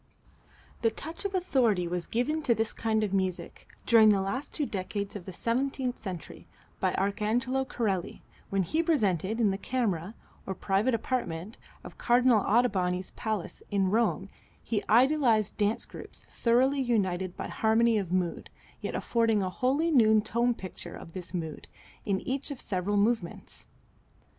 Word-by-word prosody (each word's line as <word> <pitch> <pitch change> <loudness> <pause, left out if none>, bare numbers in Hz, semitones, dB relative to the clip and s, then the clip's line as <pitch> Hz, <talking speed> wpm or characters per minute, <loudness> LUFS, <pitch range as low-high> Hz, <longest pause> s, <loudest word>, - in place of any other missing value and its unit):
The 230 - +4
touch 320 - -7
of 395 -1 -2
authority 240 - +2
was 175 0 -3
given 300 +7 0
to 245 -6 +2
this 225 0 -1
kind 220 -1 0
of 200 -2 -2
music, 190 -2 -2 0.2
during 225 -2 +7
the 205 -2 +4
last 250 +9 -3
two 300 - -1
decades 200 -1 -4
of 190 -4 -7
the 190 - -6
seventeenth 255 +5 -1
century, 185 -6 -7 0.3
by - - +1
Arcangelo 230 +7 0
Corelli 195 -7 -2 0.3
when 195 -1 +1
he 315 - 0
presented 220 - +1
in 215 -4 +3
the 195 - -3
camera, 210 -6 -2 0.3
or 190 - -3
private 205 +7 +1
apartment, 220 -5 -3 0.2
of - - -11
Cardinal 245 -1 +4
Ottoboni's 190 -5 +1
palace, 215 -5 -4
in 195 -2 +1
Rome, 215 -3 +1 0.3
his 215 -3 -1
idealized 240 -4 +4
dance 210 +2 +1
groups, - - -8
thoroughly 260 +4 +3
united 190 -7 0
by - - -4
harmony 225 0 +3
of 185 -4 -4
mood, 180 -2 -1 0.3
yet - - -4
affording 225 -3 +1
a 185 - -2
wholly 275 - +1
new 220 -6 +5
tone 235 +3 +1
picture 180 -3 -8
of 165 - -10
this 185 -2 -7
mood 160 -4 -5 0.4
in 195 -2 0
each 270 +3 -3
of 280 -3 -6
several 195 +2 -1
movements. 205 -4 -1
220 Hz, 155 wpm, -29 LUFS, 190-245 Hz, 0.4 s, during